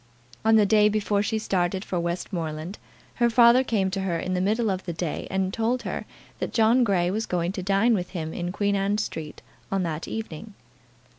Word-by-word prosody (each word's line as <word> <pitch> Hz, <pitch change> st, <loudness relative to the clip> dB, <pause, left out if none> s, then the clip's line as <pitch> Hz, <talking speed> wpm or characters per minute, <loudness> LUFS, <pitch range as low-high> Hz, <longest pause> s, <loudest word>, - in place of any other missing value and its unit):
On 220 Hz, 0 st, +5 dB
the 215 Hz, -2 st, +6 dB
day 210 Hz, +1 st, +5 dB
before 210 Hz, -1 st, +1 dB
she 215 Hz, +2 st, -1 dB
started 190 Hz, -2 st, -1 dB
for 180 Hz, -, -2 dB
Westmoreland 170 Hz, 0 st, -4 dB, 0.4 s
her 240 Hz, -1 st, +3 dB
father 235 Hz, +2 st, +6 dB
came 200 Hz, -6 st, 0 dB
to 195 Hz, 0 st, -2 dB
her 180 Hz, -3 st, -1 dB
in 185 Hz, -, -3 dB
the 180 Hz, -, 0 dB
middle 215 Hz, +3 st, +1 dB
of 190 Hz, 0 st, -4 dB
the 175 Hz, -, -3 dB
day, 165 Hz, -1 st, -4 dB
and 190 Hz, 0 st, -1 dB
told 240 Hz, +2 st, 0 dB
her -, -, -4 dB, 0.3 s
that -, -, -3 dB
John 230 Hz, +3 st, +4 dB
Grey 180 Hz, -5 st, +1 dB
was 220 Hz, +3 st, -2 dB
going 175 Hz, 0 st, -1 dB
to 190 Hz, -1 st, -5 dB
dine 200 Hz, +5 st, +3 dB
with 180 Hz, -4 st, -1 dB
him 160 Hz, -4 st, -5 dB
in 175 Hz, 0 st, -3 dB
Queen 200 Hz, +1 st, 0 dB
Anne 200 Hz, +1 st, +1 dB
Street 160 Hz, -8 st, -5 dB, 0.3 s
on 195 Hz, -1 st, +1 dB
that 165 Hz, -1 st, -3 dB
evening. 215 Hz, -1 st, -6 dB
195 Hz, 205 wpm, -25 LUFS, 175-220 Hz, 0.4 s, the